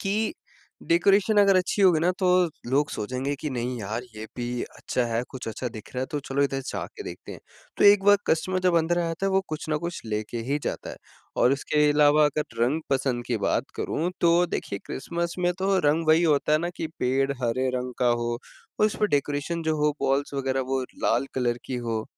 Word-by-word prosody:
कि 210 +2 0 0.6
डेकोरेशन 195 +5 +4
अगर 200 -2 +6
अच्छी 185 +2 +1
होगी 175 -5 +5
ना 175 +2 +3
तो 185 - +2 0.4
लोग 145 +3 +2
सोचेंगे 130 +6 -3
कि, 150 - -4
"नहीं 125 0 -3
यार 110 +4 -3
ये 110 - -6
भी 120 0 -3
अच्छा 125 - -3
है, 115 +1 -1
कुछ 130 - -8
अच्छा 120 +3 -4
दिख 110 -2 -11
रहा 125 - -2
है 130 - -2
तो 145 - 0
चलो 140 +1 -1
इधर 135 -1 0
जा - - -3
के 420 - -6
देखते 390 - -8
हैं।" - - -10 0.4
तो - - +2
एक 205 -1 +7
बार 205 0 +7
कस्टमर 185 +3 +1
जब 180 -2 +3
अंदर 170 +2 +1
आ 170 - +1
जाता 165 +4 -2
है 195 - +1
वो 190 - +4
कुछ 155 0 -5
ना 155 - +1
कुछ 170 0 -4
लेके 110 +2 -3
ही 145 - +2
जाता - - -4
है - - -9 0.5
और 125 - +5
उसके 150 +2 +2
अलावा 150 0 +5
अगर 150 +1 -1 0.2
रंग 145 +7 +1
पसंद 130 -3 0
की 120 -2 0
बात - - +1
करूँ, 170 +4 -1
तो 170 +1 +4
देखिए 100 - -4
क्रिसमस 170 +4 -3
में 180 0 +2
तो 190 0 +2
रंग 160 +2 +1
वही 160 +2 +5
होता 150 -2 +2
है 155 - +5
ना 175 +2 -2
कि 160 - -3
पेड़ 135 +2 +1
हरे 130 +2 0
रंग 125 0 -4
का 125 - +3
हो 120 - -1 0.5
और 215 - +6
उसमें 210 0 0
डेकोरेशन 145 +4 -1
जो 160 -1 0
हो 150 0 +2
बॉल्स 140 +1 0
वगैरह 135 -1 0
वो 135 - +1 0.2
लाल - - +2
कलर 120 -2 0
की 130 - -3
हो, 115 -2 -2
145 Hz, 220 wpm, -26 LUFS, 125-170 Hz, 0.6 s, एक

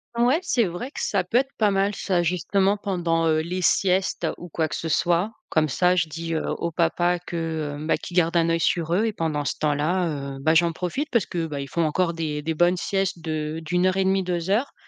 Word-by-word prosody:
Ouais, 245 +6 +3
c'est 265 -10 +1
vrai 180 +8 -5
que - - -8
ça 195 -3 0
peut 185 +7 0
être 270 +1 +1
pas 215 -2 +4
mal 195 +1 +1
ça 185 -3 0
justement 190 +3 +1
pendant, 175 -5 0
heu, 155 -1 +3
les 180 +3 -3
siestes 185 +1 +2
ou 175 - -9
quoi 160 0 -1
que - - -5
ce 165 - -4
soit. 175 +6 +1 0.2
Comme 155 -1 +2
ça, 180 +5 +3
je 165 -3 +1
dis, 165 +2 -4
heu, 160 - -1
au 170 - -2
papa, 175 +1 +1
que, 165 -4 -3
hem, 150 +1 -6
ben, 160 - +2
qu'il 180 - -7
garde 170 -1 +3
un 165 -1 +3
œil 165 0 +1
sur 165 0 +1
eux 210 +4 +2
et 225 - -1
pendant 155 -5 -2
ce - - 0
temps-là, 150 -2 -1
heu, - - -10
bah, 160 +3 +3
j'en 170 +1 +4
profite 185 - -3
parce 235 -6 +2
que, 170 -2 -2
bah, 150 -3 -5
ils 140 - -6
font 170 - 0
encore 170 +2 +1
des 155 -3 -3
des 160 +2 -2
bonnes 175 +3 +3
siestes 195 0 -1
de 155 -1 -3
d'1 180 +3 +1
heure 185 0 +2
et 195 - +3
1/2, 190 0 +2
2 175 -1 -2
heures 225 +8 +1
175 Hz, 245 wpm, -24 LUFS, 160-190 Hz, 0.2 s, pas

